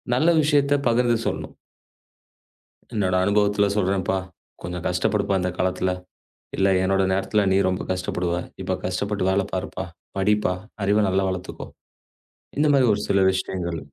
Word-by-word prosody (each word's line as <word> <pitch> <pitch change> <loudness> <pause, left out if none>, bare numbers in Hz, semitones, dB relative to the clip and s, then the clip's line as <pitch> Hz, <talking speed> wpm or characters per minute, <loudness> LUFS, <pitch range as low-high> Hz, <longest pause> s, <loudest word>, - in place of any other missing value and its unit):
நல்ல 160 +6 +3
விஷயத்த 145 -1 +3
பகிர்ந்து 120 0 +3
சொல்லணும். - - -4 1.4
என்னோட 95 -4 +1
அனுபவத்துல 100 0 +2
சொல்றேன்ப்பா. 95 -1 +1 0.4
கொஞ்சம் 90 0 -6
கஷ்டப்படுப்பா 100 +2 0
இந்த 90 - 0
காலத்துல, 95 0 0 0.7
இல்ல 95 - +3 0.2
என்னோட 95 0 +2
நேரத்துல 100 +1 +1
நீ 95 - +4
ரொம்ப 90 - -2
கஷ்டப்படுவ. 90 -1 -1 0.3
இப்ப - - -1
கஷ்டப்பட்டு 95 +1 -1
வேலை 100 0 +1
பாருப்பா. 95 0 -3 0.3
படிப்பா 105 -1 +2 0.3
அறிவு 105 0 +3
நல்லா 95 +1 +1
வளர்த்துக்கோ. 90 0 -6 0.9
இந்த 150 - +4
மாரி 130 -3 +4
ஒரு 105 - -2
சில 100 -1 +3
விஷயங்கள். 90 -3 -3
95 Hz, 130 wpm, -23 LUFS, 95-105 Hz, 1.4 s, நீ